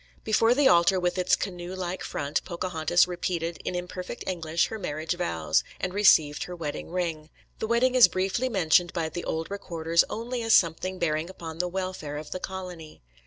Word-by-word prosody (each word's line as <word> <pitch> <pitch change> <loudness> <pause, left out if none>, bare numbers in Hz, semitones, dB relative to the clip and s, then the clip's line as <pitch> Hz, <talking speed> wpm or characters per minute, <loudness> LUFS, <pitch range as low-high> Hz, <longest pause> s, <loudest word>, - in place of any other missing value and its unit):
Before 225 +2 +3
the 285 0 +4
altar 175 0 +5
with 180 +1 -1
its 180 0 +3
canoe 180 -1 -5
like 185 0 -4
front 145 +1 -2
Pocahontas 175 -1 +1
repeated 170 -1 -3
in - - -3
imperfect 180 +5 -5
English 165 -2 0
her 220 - -5
marriage 160 -2 -3
vows, 80 - 0 0.2
and 180 - -3
received 155 -7 +4
her 180 - -7
wedding 155 -4 -5
ring. 165 -3 -3 0.3
The 220 - -2
wedding 240 +3 +3
is 255 -2 +8
briefly 195 +7 -1
mentioned 175 -4 +3
by 165 -3 -1
the 175 - -5
old 160 +3 -3
recorders 170 -4 +1
only 235 +3 -4
as 225 -1 +4
something 185 +2 +2
bearing 160 -1 -1
upon 165 -3 -8
the 180 - +1
welfare 185 -5 -4
of 150 0 -8
the 185 - -3
colony. 180 - -8
180 Hz, 180 wpm, -27 LUFS, 160-190 Hz, 0.3 s, is